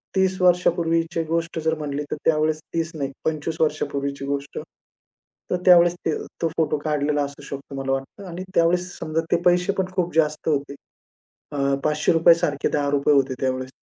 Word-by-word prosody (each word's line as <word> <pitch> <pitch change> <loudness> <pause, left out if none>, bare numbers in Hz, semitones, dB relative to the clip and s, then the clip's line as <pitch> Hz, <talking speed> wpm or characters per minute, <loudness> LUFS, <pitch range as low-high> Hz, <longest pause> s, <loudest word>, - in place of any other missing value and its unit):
30 190 0 +2
वर्षापूर्वीची 170 -2 +2
गोष्ट 165 +1 -2
जर 160 - +2
म्हटली 145 -1 -3
तर - - 0
त्यावेळेस 155 0 +2
30 165 0 -1
नाही 140 -2 -3
25 160 0 -2
वर्षापूर्वीची 140 -2 -1
गोष्ट, 140 0 -3 0.9
तर - - +3
त्यावेळेस 175 -1 +7
ते 160 - +1 0.2
तो 165 - +2
फोटो 155 -2 +1
काढलेला 145 -1 +1
असू 140 0 -7
शकतो 140 0 -8
मला 135 - -2
वाटतं. 135 +9 -4
आणि 175 +2 -6
त्यावेळेस 175 +2 +2
समजा 155 +1 -1
ते 170 - +2
पैसेपण 180 +2 +2
खूप 175 -3 0
जास्त 155 -1 +1
होते. 140 -1 -1 0.8
अ, 140 -1 0
₹500 165 +2 +4
सारखे 150 -4 -1
₹10 145 0 +2
होते 135 -1 +2
त्यावेळेस. 130 -1 -1
155 Hz, 155 wpm, -23 LUFS, 140-170 Hz, 0.9 s, त्यावेळेस